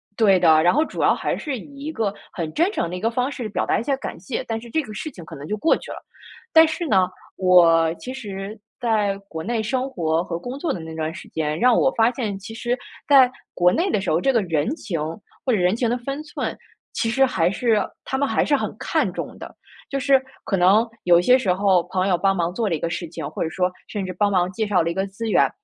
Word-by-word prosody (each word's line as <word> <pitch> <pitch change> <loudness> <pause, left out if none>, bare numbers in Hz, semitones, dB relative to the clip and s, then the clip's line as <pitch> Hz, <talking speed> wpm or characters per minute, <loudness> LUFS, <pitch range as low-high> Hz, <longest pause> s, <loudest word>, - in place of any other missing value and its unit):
对 200 -4 +4
的， 160 -3 +5
然 175 - +4
后 305 +3 +3
主 - - -5
要 - - +5
还 - - -2
是 275 -7 -4
以 280 +2 -11
一 310 - -3
个 215 -7 -1 0.2
很 165 -5 -4
真 345 +6 +2
诚 170 - -2
的 180 - -5
一 180 - -6
个 225 +1 +1
方 250 +3 0
式 245 -6 -5
表 - - -1
达 - - +1
一 230 - -2
下 275 0 0
感 - - -6
谢， 180 - -4
但 225 -1 -2
是 235 - -11
这 315 - +1
个 215 -6 -9
事 310 +7 -5
情 175 -8 -11
可 - - -10
能 140 +1 -9
就 210 +6 -3
过 325 - +3
去 - - -9
了。 - - -6 0.6
但 320 0 +8
是 320 +1 -3
呢， 185 -5 +3 0.3
我 165 -3 +5
其 255 - -7
实 205 -4 -6 0.2
在 210 -5 +1
国 160 -4 -6
内 230 0 -1
生 255 +4 -1
活 165 -7 0
和 170 -2 -4
工 245 +8 -6
作 305 0 -2
的 175 - -3
那 160 0 -8
段 160 0 -3
时 190 - -10
间， 155 0 -2
让 250 -1 +5
我 265 - +3
发 225 +1 +5
现， 210 -7 -3
其 220 +3 -9
实 240 +2 -2 0.3
在 265 -3 +7 0.2
国 180 0 +3
内 360 +3 +1
的 - - +1
时 190 - -3
候， 165 +3 +2
这 270 - +3
个 230 -4 +2
人 170 - 0
情 170 - -4 0.4
或 255 - +2
者 215 - +2
人 180 +3 +2
情 235 0 0
的 245 - 0
分 275 +5 -5
寸， 300 - -4 0.4
其 225 - -1
实 270 +3 +4
还 175 -8 +1
是 225 0 +2 0.3
他 265 - -2
们 280 - +1
还 - - +1
是 290 - +3
很 - - -4
看 - - 0
重 - - -6
的。 - - -10 0.4
就 275 - -2
是 270 -1 +4 0.2
可 195 - -1
能 195 +6 +5 0.2
有 175 -1 +6
一 - - +4
些 250 +7 +5
时 195 -8 +1
候 190 -2 +3
朋 185 +1 -1
友 180 - +3
帮 195 +2 +2
忙 175 0 -1
做 220 +1 -1
了 170 - +1
一 150 - -5
个 170 - -2
事 170 0 -4
情， 165 - -7
或 - - -6
者 160 - -2
说 180 +1 0 0.2
甚 200 -3 -4
至 185 - -4
帮 205 +3 +1
忙 180 -1 +1
介 215 +1 -2
绍 190 -4 +3
了 170 - -1
一 170 - -2
个 195 +1 -1
资 220 +3 -5
源， - - +4
205 Hz, 290 characters per minute, -22 LUFS, 180-250 Hz, 0.6 s, 但